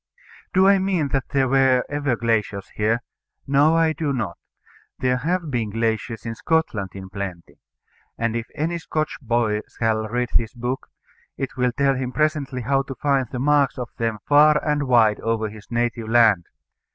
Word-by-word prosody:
Do 190 +1 +4
I 200 0 +5
mean 185 -6 0
that 135 -1 -1
there 135 -2 +2
were 130 -1 +3
ever 145 -3 -1
glaciers 110 -4 -1
here? 110 +3 0 0.4
No, 145 +4 +4
I 165 -1 +3
do 155 -2 -2
not. 110 -10 -3 0.6
There 125 0 +1
have 165 +3 -2
been 115 -4 -1
glaciers 115 +1 -2
in 115 - -3
Scotland 115 - 0
in 95 -1 -7
plenty. 95 -3 -7 0.6
And 115 0 -1
if 115 0 -3
any 165 +3 -1
Scotch 155 -2 -3
boy 115 -4 0 0.2
shall 110 -1 0
read 120 +2 -1
this 115 +1 +1
book, 125 +2 -3 0.5
it 135 - -4
will 125 -1 +1
tell 140 +2 +2
him 130 -1 -3
presently 150 -4 -1
how 135 +3 +2
to 135 -1 -7
find 135 0 +1
the 130 - -4
marks 140 +1 +2
of 125 -3 -5
them 115 -2 -1
far 150 +1 +6
and 145 -2 0
wide 115 -4 +4
over 115 -1 -1
his 105 0 -13
native 120 -1 -1
land. 110 -7 +4
125 Hz, 175 wpm, -22 LUFS, 115-145 Hz, 0.6 s, far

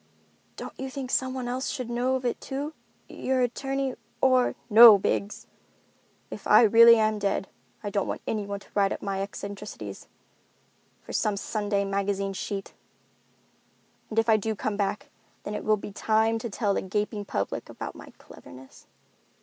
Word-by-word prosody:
"Don't - - -8
you 265 0 -4
think 260 -1 -6
someone 260 -1 -1
else 255 +2 -2
should 255 -4 -4
know 245 +2 0
of 260 -1 -4
it 240 - -1
too? 285 +3 -4 0.3
Your 260 -1 -1
attorney, 270 +2 -1 0.3
or——" 255 -1 +3
"No, 225 -1 +10
Biggs. 200 +1 -2 0.9
If - - -7
I - - +7
really 230 +1 +8
am 215 -1 +1
dead 200 -1 -1 0.4
I 205 - -4
don't 200 -1 -1
want - - -4
anyone 200 -2 -3
to - - -17
write 200 -1 +2
up - - -5
my 195 -1 -2
eccentricities 200 +1 -7 1.0
for - - -9
some 210 -3 0
Sunday 205 -1 -1
magazine 195 0 -1
sheet. 195 +1 -5 1.4
And 220 - -7
if 225 0 +3
I 220 -1 +5
do 220 +1 -2
come 210 +1 -2
back, 205 0 -2 0.3
then 205 - -5
it - - -4
will 215 0 +3
be 205 - -8
time 220 +2 +1
to 235 - -5
tell 205 -1 0
the - - -1
gaping 205 +2 -2
public 100 - -3
about - - -7
my - - -12
cleverness." 130 +1 -15
215 Hz, 165 wpm, -27 LUFS, 200-245 Hz, 1.4 s, No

